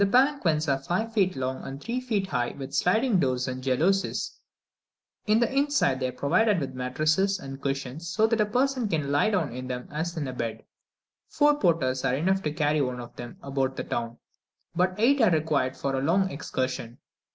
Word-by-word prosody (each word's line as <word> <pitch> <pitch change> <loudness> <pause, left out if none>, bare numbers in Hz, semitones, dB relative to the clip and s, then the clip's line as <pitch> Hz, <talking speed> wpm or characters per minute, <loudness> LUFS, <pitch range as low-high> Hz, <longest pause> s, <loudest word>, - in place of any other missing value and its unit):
The 200 - +5
palanquins 195 - +3
are 135 -1 +2
five 185 +11 -2
feet 190 -4 +2
long 130 0 -3
and 135 +1 -7
three 235 - -3
feet 220 -6 -1
high, 125 -8 -2
with 135 -1 -7
sliding 220 +3 +2
doors 130 -3 0
and 130 0 -4
jalousies: 165 +10 0 0.9
in 215 +1 +4
the 235 +2 0
inside 280 - +2
they 130 - 0
are - - -3
provided 185 - +2
with 135 -3 -4
mattresses 155 +10 +1
and 135 -5 -8
cushions, 140 +3 -3
so 215 +6 +2
that 225 -1 +2
a 210 - +2
person 250 0 +1
can 150 -5 -1
lie 145 +9 +3
down 180 - 0
in 130 +1 -6
them 125 -1 -5
as 165 +3 -3
in 145 -3 -2
a 130 - -4
bed. 115 -3 -4 0.7
Four 295 0 +3
porters 150 - +1
are 130 -1 +2
enough 190 +7 +1
to 150 - -2
carry 150 -1 +1
one 125 -2 -2
of 120 -1 -9
them 120 -1 -8
about 135 -1 -1
the - - -3
town, 115 0 -3 0.6
but 185 +1 +1
eight 260 +5 +4
are 220 - +6
required 150 -5 +1
for 140 -1 -2
a 135 - 0
longer 185 +6 +2
excursion. 130 -4 -3
155 Hz, 200 wpm, -27 LUFS, 130-200 Hz, 0.9 s, are